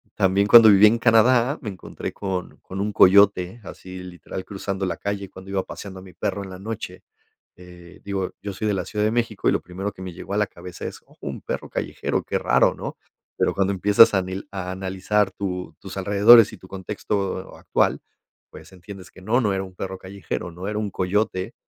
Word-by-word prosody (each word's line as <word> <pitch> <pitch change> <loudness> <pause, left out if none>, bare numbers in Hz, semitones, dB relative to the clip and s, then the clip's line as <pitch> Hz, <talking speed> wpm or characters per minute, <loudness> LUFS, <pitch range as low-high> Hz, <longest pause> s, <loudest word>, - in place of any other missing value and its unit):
también 95 +2 +2
cuando 115 0 +9
viví 100 +1 +8
en 115 +2 +3
Canadá 120 +4 +4
me 110 - -5
encontré 95 - -7
con 95 -2 -4
con 95 +1 -6
un 105 - -1
coyote, 100 +2 +5
así 95 0 -10
literal, 90 +1 -8
cruzando 95 -1 -4
la 85 - -3
calle 100 -1 -4
cuando 95 +1 -11
iba 95 -1 0
paseando 95 -2 -9
a - - -12
mi 95 -2 -14
perro 100 +4 -3
en 95 - -9
la 90 - -8
noche. 110 +1 -7 0.5
Eh, 90 -1 -14
digo, 100 -2 -3
yo 100 - -5
soy 110 +3 -3
de 105 - +1
la 90 -2 -3
Ciudad 105 -1 -1
de 110 - +2
México 115 -4 -1
y - - +3
lo - - 0
primero 95 +4 -5
que 95 - -13
me 95 -1 -6
llegó 95 +3 -8
a - - 0
la 105 - +1
cabeza 90 0 -10
es - - -9
oh, - - -24
un - - -6
perro - - -5
callejero, - - -2
qué - - -2
raro, - - +3
¿no? - - -7 0.4
Pero - - +1
cuando 95 0 +1
empiezas 105 +4 +6
a 95 - +3
nil 95 +1 -6
a 95 -2 -4
analizar 95 +2 0
tu 90 -2 -5
tus 95 0 -9
alrededores 105 +3 +6
y 110 - -9
tu 95 - -15
contexto 95 0 -4
actual, - - 0 0.5
pues - - -13
entiendes 95 +1 -11
que 95 - -15
no, 110 +6 +1
no 105 -4 +1
era 95 - -1
un 95 -1 -11
perro 95 0 -5
callejero, 95 -2 -6
¿no? 90 +3 -7
era 105 0 -2
un 105 -1 -2
coyote 95 +2 -1
95 Hz, 215 wpm, -23 LUFS, 95-105 Hz, 0.5 s, cuando